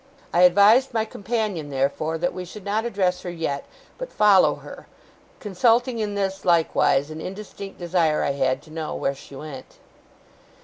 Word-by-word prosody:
I 175 - +3
advised 205 +8 +5
my 220 -1 +1
companion, 205 -7 -3
therefore, 140 +4 -1
that 175 +2 -1
we 185 - -5
should 185 +3 -11
not 215 +3 -1
address 190 -6 0
her 180 - -6
yet, 160 -5 -3 0.3
but - - -6
follow 205 -3 +5
her; - - -12 0.5
consulting 230 +4 +1
in 210 -2 -2
this, 195 -1 -2
likewise, 160 -4 +2
an 155 - -7
indistinct 195 0 -8
desire 170 -3 +1
I - - +1
had, 130 0 -1
to 155 - -17
know 160 -1 -4
where 140 - -1
she 140 0 -13
went. 135 -2 -10
180 Hz, 165 wpm, -23 LUFS, 155-210 Hz, 0.5 s, advised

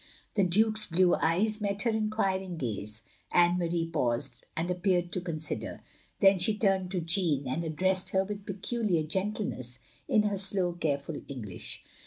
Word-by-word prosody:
The 200 - +2
Duke's 215 +4 +3
blue 175 +1 +3
eyes 210 +7 +2
met 200 -1 +1
her 235 - +2
enqtdring 195 -4 -1
gaze. 110 -5 -4 0.3
Anne 175 0 +4
Marie 170 -1 0
paused, 130 -5 -2
and 170 +2 -1
appeared 180 -1 +1
to 180 - -1
consider. 160 -3 -4 0.4
Then 195 -1 +6
she 210 +4 +3
ttimed 195 -3 +2
to 180 -1 -1
Jeanne, 165 -4 +1
and 130 +6 -2
addressed 185 +4 +1
her 190 0 +2
with 205 0 -7
peculiar 195 -3 0
gentleness, 165 - -2 0.3
in 215 - +3
her 205 -1 0
slow, 190 -2 +2
careful 150 -2 -2
English. 110 -10 -5
180 Hz, 155 wpm, -29 LUFS, 160-200 Hz, 0.4 s, Then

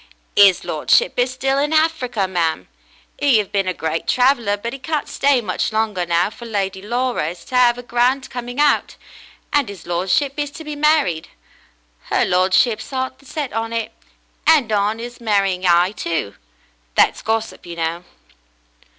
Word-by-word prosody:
"'Is 195 -3 +6
lordship 485 - +2
is 245 +1 +2
still 270 +1 0
in 290 +1 +1
Hafrica, 285 -10 +1
mam. 170 -3 -1 0.5
'E 275 -6 +4
'ave 205 - -3
been 195 -2 0
a - - +1
great 160 0 -3
traveller, 245 -5 +2
but 235 +4 -5
'e 275 - -7
can't 300 +2 -2
stay 275 -3 +2
much 190 -1 -2
longer 215 -5 -1
now, 170 +4 +1
for 235 +1 -10
Lady 195 -3 -2
Laura 240 -4 -1
is 175 - -10
to 255 - -6
'ave 245 -1 +4
a - - -8
grand 245 +2 +1
coming 245 +2 -6
out, 295 -1 +2 0.6
and 285 -7 +2
'is 195 -4 -10
lordship 185 +11 0
is 290 -1 -2
to 305 +3 -10
be 300 -1 -6
married. 290 - +2 0.8
Her - - +1
ladyship's 185 +6 +2
'eart 260 0 -3
is 275 - -19
set 295 -5 -4
on 225 0 -2
it, 230 -1 -2 0.6
and 290 -8 +4
on 210 +2 +1
'is 240 +1 -8
marrying 195 -4 +1
'igh, 175 +1 +4
too. 165 - -3 0.6
That's - - +3
gossip, 225 -3 -3
you 170 - -7
know." 165 +1 -3
225 Hz, 170 wpm, -20 LUFS, 190-260 Hz, 0.8 s, Is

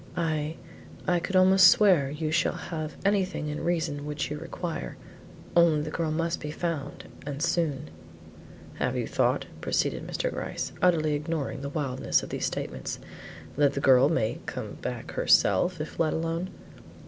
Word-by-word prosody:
I 160 -2 -1 0.5
I 175 -1 +3
could 190 +3 -4
almost 185 0 +7
swear 180 -9 +5
you 155 +2 -3
shall 170 - +2
have 155 -3 -5
anything 190 -6 +1
in 150 - -4
reason 160 -4 -1
which 150 0 -3
you 150 - -3
require; 165 - -5 0.6
only 170 -3 +5
the 155 - -5
girl 165 -1 -1
must 165 +2 -1
be 150 - -5
found 160 -2 -4 0.2
and 140 -1 -5
soon." 155 - 0 0.9
"Have - - 0
you - - -1
thought," - - +1 0.2
proceeded - - -1
Mr. - - -2
Gryce, - - -4
utterly 160 -4 +3
ignoring 150 -2 -3
the 140 - -4
wildness 140 -4 0
of - - -7
these - - -1
statements, - - -4 0.6
"that 145 -1 +3
the 140 - -2
girl 135 0 +6
may 115 -9 0
come - - -5
back - - -5
herself 180 -2 +3
if 155 - -6
let 160 -2 +2
alone?" 165 +3 -2
155 Hz, 160 wpm, -27 LUFS, 145-170 Hz, 0.9 s, almost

